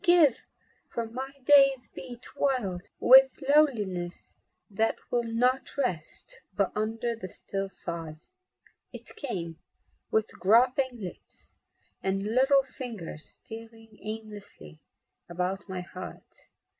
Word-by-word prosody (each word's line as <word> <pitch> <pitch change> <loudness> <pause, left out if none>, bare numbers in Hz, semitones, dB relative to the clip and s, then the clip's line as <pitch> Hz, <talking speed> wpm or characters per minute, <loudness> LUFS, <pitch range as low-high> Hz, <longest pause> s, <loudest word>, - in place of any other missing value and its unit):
"Give, 345 -7 +5 0.4
for 235 - -2
my 255 +4 -5 0.2
days 275 -3 +6
beat 240 +10 -10
wild 240 -11 0
With 265 +1 +8
loneliness 205 - +1 0.4
that 220 +3 +1 0.2
will 240 -1 +1
not 250 +4 +1
rest 185 - -2
But 200 -2 +2
under 225 +2 -1
the 205 -4 -7
still 195 +2 -4
sod!" 165 -4 -5 0.7
It - - -9
came 170 - -4 0.5
with 220 0 +1
groping 245 +5 +4
lips 180 -3 -8 0.4
And 195 +1 0
little 265 +6 +4
fingers 225 - -7
stealing 225 -1 -11
aimlessly 210 - -8 0.5
About 180 +3 -2
my 185 -1 -3
heart. 180 +1 -10
225 Hz, 105 wpm, -29 LUFS, 185-255 Hz, 0.7 s, With